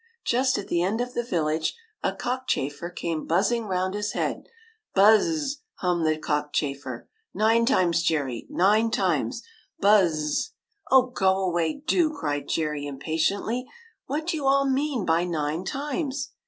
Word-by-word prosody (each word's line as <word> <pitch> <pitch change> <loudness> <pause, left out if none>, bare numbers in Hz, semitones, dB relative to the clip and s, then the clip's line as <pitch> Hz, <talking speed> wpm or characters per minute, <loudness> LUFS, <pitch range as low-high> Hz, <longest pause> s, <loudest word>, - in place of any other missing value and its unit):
Just 260 +2 +2
at 200 - -5
the 170 - +1
end 200 +6 0
of 245 0 -3
the 240 - 0
village, 160 -7 -1 0.3
a - - +1
cockchafer 170 - -2
came 165 -3 -4
buzzing 210 +7 +1
round 185 -1 -1
his 205 0 -2
head. - - -2 0.2
" 440 -1 -38
Buz 210 +2 +7
z 330 - 0
z! 290 -2 -2
" - - -60
hummed 175 -3 +1
the 155 0 +2
cockchafer. 145 -4 -2
" 450 - -52
Nine 225 +2 +3
times, 180 -11 +3
Jerry, 145 -8 -1
nine 210 +5 +3
times! - - 0 0.4
Buz 200 -4 +5
z 155 0 -2
z! 150 - -1
" 440 -2 -50
" - - -21
Oh, 265 -1 +7
go 190 -7 +1
away, 175 - -1
do! 335 -1 +3
" - - -10
cried 145 -2 -2
Jerry, 150 -2 -1
impatiently. 165 - -1 0.4
"What 300 +4 -2
do 340 -1 -1
you 280 -3 -2
all 275 0 +4
mean 270 -5 0
by 165 +1 +2
nine 160 0 -2
times 275 - -3
195 Hz, 180 wpm, -25 LUFS, 160-260 Hz, 0.4 s, Buz